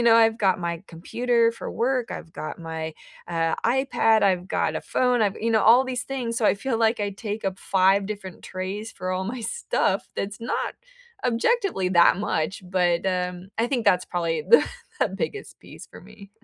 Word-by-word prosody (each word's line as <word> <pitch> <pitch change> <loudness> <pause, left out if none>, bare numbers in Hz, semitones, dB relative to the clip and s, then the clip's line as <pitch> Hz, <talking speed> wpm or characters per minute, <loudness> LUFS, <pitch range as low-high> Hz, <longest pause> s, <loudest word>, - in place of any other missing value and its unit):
you - - +1
know, 230 -1 +6
I've 225 0 +4
got 190 -3 +2
my 170 0 -3
computer 230 +7 +1
for - - -7
work, 250 0 0
I've 165 - -7
got - - -6
my, 160 -1 -5 0.3
uh, 165 -1 0
iPad, 235 -3 +3
I've 185 -2 +2
got - - 0
a - - -3
phone, 250 -2 +1
I've 205 -2 +1
you 230 - -1
know, 220 -1 +3
all 245 +4 +6
these 255 -1 -3
things, 245 -4 -3
so 220 - +2
I - - +4
feel 225 +3 -2
like 225 0 +2
I 205 -1 -1
take 210 +1 -5
up 190 0 -2
5 195 +1 +3
different 195 -4 -7
trays 195 +4 -5
for 185 0 -5
all 185 +1 -1
my 245 +4 -4
stuff 475 - -1
that's 200 +2 -4
not 230 - -2 0.5
objectively 250 - +1
that 175 0 +6
much, 190 -2 -2
but, 180 -2 +1
um, 180 0 -2
I 230 - +2
think 245 -3 -1
that's 180 -3 +3
probably 170 -2 -1
the 470 - +7 0.4
the - - +3
biggest 455 -3 -5
piece - - -12
for - - -13
me. 200 -2 -15
205 Hz, 195 wpm, -24 LUFS, 185-235 Hz, 0.5 s, the